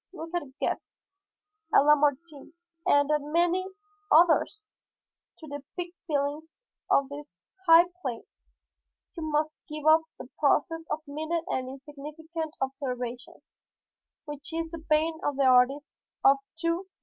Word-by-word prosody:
Look 330 -2 -8
at 350 - 0 0.2
Goethe, - - 0 1.0
at - - +9
Lamartine 295 +1 +1 0.3
and 285 +1 +4
at 300 -1 +2
many 345 +5 +1 0.4
others! 350 +6 +4 0.7
To 315 - -11
depict 325 +5 -7
feelings 300 - -3 0.3
on 275 - +3
this 285 -11 -10 0.3
high 330 +1 +9 0.2
plane, 245 -7 -4 0.9
you 335 - -6
must 305 +1 -1
give 305 0 -6
up 315 +1 +6
the - - -9
process 320 +2 +1
of 310 - -3
minute 315 +3 -2
and 255 0 -2
insignificant 305 +4 -7
observation 250 -3 -4 0.8
which 295 0 -8
is 330 0 -3
the 335 - -6
bane 315 +1 +1
of 290 - 0
the 280 - +2
artists 260 +3 +4 0.3
of 275 +1 +7 0.2
to 335 +2 0
day. - - -40
305 Hz, 130 wpm, -28 LUFS, 280-330 Hz, 1.0 s, at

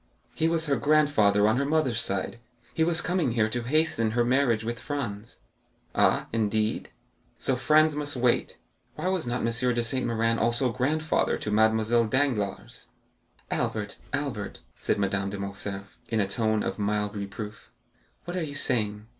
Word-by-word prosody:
"He 160 - +1
was 165 0 +1
her 140 -3 +1
grandfather 115 -8 +3
on 110 +4 +2
the - - +1
mother's 145 -6 +2
side. 100 +4 -1 0.3
He 160 - +1
was 165 0 +3
coming 175 -9 0
here 110 -2 +2
to 120 +2 -2
hasten 130 -3 +1
her 120 - +3
marriage 120 -3 +2
with 115 0 -4
Franz." 115 -6 -5 0.5
"Ah, - - +3
indeed!" 110 0 0 0.5
"So 130 - +1
Franz 155 +4 +4
must 145 -1 -2
wait. 125 -1 +1 0.4
Why 185 - -2
was 185 -7 -1
not 120 +1 -1
M. 115 +1 +1
de 120 - +1
Saint 125 +2 -1
Méran 115 0 +1
also 120 +2 +1
grandfather 150 +6 0
to 105 - -4
Mademoiselle 110 +2 +3
Danglars?" 110 -5 -1 0.6
"Albert, 105 -2 -2
Albert," 140 -8 -3 0.2
said - - 0
Madame 100 0 0
de 100 - -5
Morcerf, 100 +1 -6
in 110 - 0
a 100 - +3
tone 110 +1 0
of - - -3
mild 105 0 -1
reproof, 105 +1 -7 0.6
"what 175 - -5
are 180 - -1
you 145 -3 -4
saying? 105 -7 0
115 Hz, 165 wpm, -27 LUFS, 105-145 Hz, 0.6 s, Franz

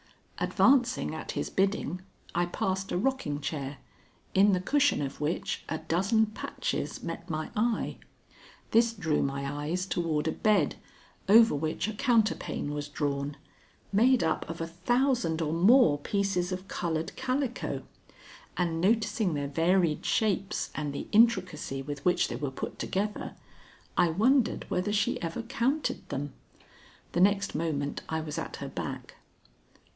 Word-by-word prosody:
Advancing 255 - +3
at 160 - -5
his - - -3
bidding, 190 -3 0 0.3
I 175 +1 +1
passed 190 +2 -2
a - - 0
rocking 210 - -1
chair, 140 -1 -4 0.6
in 200 +1 +5
the 185 - +2
cushion 285 +9 +2
of 140 0 -4
which 150 +3 -2
a 160 - -1
dozen 190 +8 +2
patches 215 - -4
met 170 +1 -6
my 155 -1 -3
eye. 225 +1 0 0.7
This 230 +1 +5
drew 160 -9 0
my 140 0 -2 0.2
eyes 180 +3 -1
toward 165 -5 -1
a - - +2
bed, 200 -6 +2 0.5
over 225 +2 +8
which 155 +6 -1
a 220 - -3
counterpane 215 - +1
was 145 0 -3
drawn, 145 -1 -2 0.5
made 235 +3 +4
up 160 -1 -1
of 165 - -5
a 165 - -1
thousand 185 - +1
or 160 -1 -1
more 175 - +5
pieces 195 +1 0
of 185 +1 -4
colored 165 -3 -2
calico, 260 -1 -2 0.7
and 165 -2 0
noticing 210 -2 +2
their 145 -1 -2
varied 165 +1 +2
shapes 195 -3 0
and 150 -2 -3
the 140 - -5
intricacy 185 - +2
with 145 0 -6
which 180 - +3
they - - -4
were 145 - -2
put 130 - -6
together, 205 +2 -2 0.6
I 175 - +4
wondered 235 - +2
whether 180 +3 -1
she 205 0 +1
ever 170 +7 -3
counted 265 +5 -1
them. 140 0 -4 0.8
The 175 - +1
next 200 +1 +3
moment 150 -3 -2
I 160 - -1
was 150 -1 -4
at - - -5
her - - -6
back. - - -6
180 Hz, 145 wpm, -29 LUFS, 155-215 Hz, 0.8 s, over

